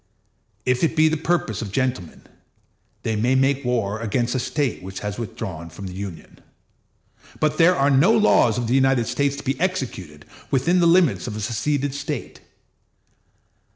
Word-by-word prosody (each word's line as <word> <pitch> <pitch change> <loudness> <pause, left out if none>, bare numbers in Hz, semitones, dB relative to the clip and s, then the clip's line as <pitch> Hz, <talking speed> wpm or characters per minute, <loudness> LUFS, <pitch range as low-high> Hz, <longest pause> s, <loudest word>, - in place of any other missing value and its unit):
If 125 +2 +1
it 165 - +1
be 155 0 +5
the 160 - 0
purpose 160 - -1
of 105 -4 -5
gentlemen, 125 -8 -2 0.8
they 110 - -1
may 120 +5 +1
make 135 +1 +2
war 110 -4 -1
against 120 +2 -1
a 130 - 0
State 130 +1 -2
which 95 +1 -7
has 105 +1 -4
withdrawn 85 -7 -6
from 90 +4 -9
the 90 - -6
Union; 95 -3 -8 1.0
but 155 0 0
there 175 +2 +6
are 140 -1 +2
no 140 +10 +5
laws 210 - +4
of 120 - -1
the 115 - 0
United 135 -2 +3
States 140 +4 0
to 140 - -8
be 135 0 -2
executed 120 - -3 0.2
within 165 +7 +2
the 170 - +4
limits 170 -7 +3
of 110 - -5
a - - -5
seceded 135 +6 -1
State. 145 -2 -5
130 Hz, 170 wpm, -22 LUFS, 110-145 Hz, 1.0 s, there